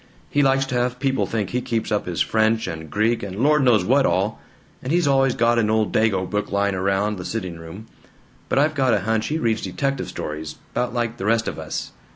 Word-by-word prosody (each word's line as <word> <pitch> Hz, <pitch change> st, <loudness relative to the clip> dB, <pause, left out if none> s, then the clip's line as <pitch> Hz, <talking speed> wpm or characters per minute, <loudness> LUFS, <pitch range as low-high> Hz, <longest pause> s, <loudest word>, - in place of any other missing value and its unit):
He 145 Hz, -, +3 dB
likes 135 Hz, -1 st, +3 dB
to 135 Hz, -, -6 dB
have 125 Hz, 0 st, 0 dB
people 135 Hz, -1 st, 0 dB
think 105 Hz, -4 st, -2 dB
he 125 Hz, -, 0 dB
keeps 115 Hz, -3 st, -2 dB
up 105 Hz, -3 st, 0 dB
his 85 Hz, -2 st, -2 dB
French 110 Hz, 0 st, +2 dB
and 80 Hz, -1 st, -6 dB
Greek 110 Hz, +5 st, +1 dB
and 95 Hz, -2 st, -6 dB
Lord 150 Hz, +7 st, +3 dB
knows 110 Hz, -7 st, +4 dB
what -, -, +4 dB
all; -, -, 0 dB, 0.4 s
and 130 Hz, -, -4 dB
he's 175 Hz, -2 st, +2 dB
always 135 Hz, -2 st, +3 dB
got 120 Hz, 0 st, +3 dB
an 105 Hz, -2 st, +1 dB
old 110 Hz, -1 st, +1 dB
Dago 100 Hz, -4 st, +2 dB
book 105 Hz, 0 st, -2 dB
lying 100 Hz, 0 st, +1 dB
around 100 Hz, +2 st, 0 dB
the -, -, -5 dB
sitting 90 Hz, -5 st, -4 dB
room, 80 Hz, +6 st, -10 dB, 0.6 s
but -, -, 0 dB
I've 150 Hz, +2 st, +3 dB
got 130 Hz, -5 st, +2 dB
a 100 Hz, -, 0 dB
hunch 110 Hz, +2 st, 0 dB
he 155 Hz, -, -1 dB
reads 115 Hz, -8 st, 0 dB
detective 135 Hz, +8 st, -2 dB
stories 75 Hz, 0 st, -5 dB, 0.2 s
'bout 125 Hz, -, -1 dB
like 120 Hz, -1 st, -1 dB
the 95 Hz, -, -3 dB
rest 115 Hz, +1 st, +2 dB
of -, -, -4 dB
us. -, -, -5 dB
110 Hz, 225 wpm, -22 LUFS, 100-125 Hz, 0.6 s, knows